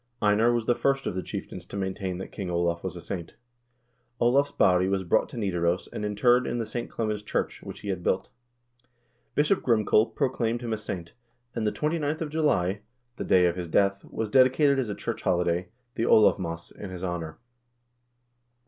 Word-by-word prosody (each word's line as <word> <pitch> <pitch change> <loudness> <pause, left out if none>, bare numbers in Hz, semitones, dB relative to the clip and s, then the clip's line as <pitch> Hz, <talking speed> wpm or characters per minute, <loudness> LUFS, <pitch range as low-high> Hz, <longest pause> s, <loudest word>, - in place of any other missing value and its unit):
Einar 105 +3 +4
was 120 -2 0
the 120 - +4
first 135 +2 0
of - - -1
the 95 - -2
chieftains 90 0 -6
to - - -7
maintain 95 -1 -3
that 95 - -7
King 95 -4 -5
Olav 85 -1 0
was 95 -1 -4
a 85 - -7
saint." 85 -3 -6 0.8
1 120 - +3
Olav's 140 +2 +3
body 90 0 +3
was 95 0 0
brought 85 - +2
to - - -9
Xidaros 90 -4 0
and - - -4
interred 120 +5 +3
in - - -2
the 115 - -1
St. 120 +2 -4
Clemens 110 -2 -2
church, 105 - -2
which - - -9
he 105 - -5
had 95 -2 -2
built. 95 - -1 1.0
Bishop 150 +7 +3
Grimkel 110 -1 +3
proclaimed 120 -4 0
him 115 -2 -2
a - - -1
saint, 90 -5 -6 0.4
and 110 -2 -1
the - - +2
29th 155 0 -1
of 155 -2 -3
July, 105 - +1 0.4
the - - -3
day 90 -1 +4
of 85 -1 +2
his 90 -2 -4
death, 100 +3 +2
was 110 - -3
dedicated 135 +4 +4
as 125 -5 -1
a 100 - -3
church - - -4
holiday, 90 0 +1 0.2
the 115 - -1
Olavmas, 85 -6 +3
in 100 - -8
his 90 0 -7
honor. 85 -3 -4
105 Hz, 195 wpm, -27 LUFS, 90-120 Hz, 1.0 s, Einar